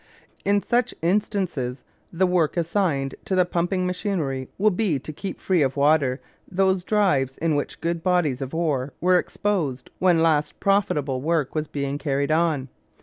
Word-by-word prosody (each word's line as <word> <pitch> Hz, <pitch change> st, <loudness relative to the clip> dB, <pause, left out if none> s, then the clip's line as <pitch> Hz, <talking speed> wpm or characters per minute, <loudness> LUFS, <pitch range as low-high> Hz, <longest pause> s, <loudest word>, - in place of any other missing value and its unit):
In 200 Hz, 0 st, +2 dB
such 240 Hz, -1 st, 0 dB
instances 175 Hz, -, -1 dB, 0.3 s
the 180 Hz, +2 st, +2 dB
work 180 Hz, -3 st, +1 dB
assigned 165 Hz, -6 st, 0 dB
to 190 Hz, -, 0 dB
the 180 Hz, -1 st, +4 dB
pumping 175 Hz, +1 st, -1 dB
machinery 180 Hz, -, -2 dB
will 215 Hz, +2 st, +3 dB
be 185 Hz, -5 st, 0 dB
to 150 Hz, +4 st, -7 dB
keep 195 Hz, +6 st, -6 dB
free 185 Hz, -4 st, +1 dB
of 135 Hz, 0 st, 0 dB
water 140 Hz, -2 st, +3 dB, 0.3 s
those 190 Hz, 0 st, +2 dB
drives 165 Hz, -12 st, +1 dB
in 165 Hz, -1 st, 0 dB
which 145 Hz, -1 st, -3 dB
good 170 Hz, 0 st, -1 dB
bodies 170 Hz, -7 st, +1 dB
of 135 Hz, +3 st, -5 dB
ore 145 Hz, -5 st, -1 dB
were 180 Hz, +1 st, +4 dB
exposed 160 Hz, -15 st, -2 dB
when 175 Hz, -3 st, +4 dB
last 150 Hz, -2 st, +1 dB
profitable 150 Hz, -10 st, +1 dB
work 155 Hz, -2 st, 0 dB
was 155 Hz, -1 st, -2 dB
being 140 Hz, 0 st, -3 dB
carried 140 Hz, -1 st, -1 dB
on. 155 Hz, -4 st, +1 dB
165 Hz, 160 wpm, -24 LUFS, 140-185 Hz, 0.3 s, the